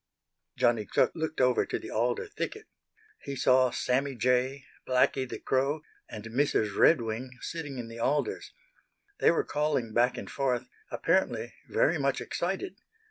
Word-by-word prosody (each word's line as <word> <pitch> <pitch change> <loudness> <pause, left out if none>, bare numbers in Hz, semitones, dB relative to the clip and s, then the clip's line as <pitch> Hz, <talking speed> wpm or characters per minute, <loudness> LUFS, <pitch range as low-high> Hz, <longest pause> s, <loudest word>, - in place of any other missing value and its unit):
Johnny 115 -3 +2
Chuck - - +3
looked 160 -1 -3
over 125 -2 +4
to - - -3
the - - -8
alder 120 +2 0
thicket. - - -5 0.6
He 140 - -5
saw 130 0 +4
Sammy 135 +3 0
Jay, 125 +2 +1 0.2
Blacky 130 0 +2
the - - -4
Crow 140 +4 0 0.3
and 105 - -7
Mrs. 115 -3 +1
Redwing 125 -3 +2
sitting 150 -5 -5
in 120 -2 -5
the 115 0 -9
alders. 145 +5 -1 0.7
They - - +5
were 170 - +2
calling 145 -7 -1
back 120 +2 +3
and - - -6
forth, 130 -3 -1 0.2
apparently - - 0 0.2
very 160 +1 +2
much 140 -1 +1
excited. 195 - -3
130 Hz, 145 wpm, -29 LUFS, 120-145 Hz, 0.7 s, They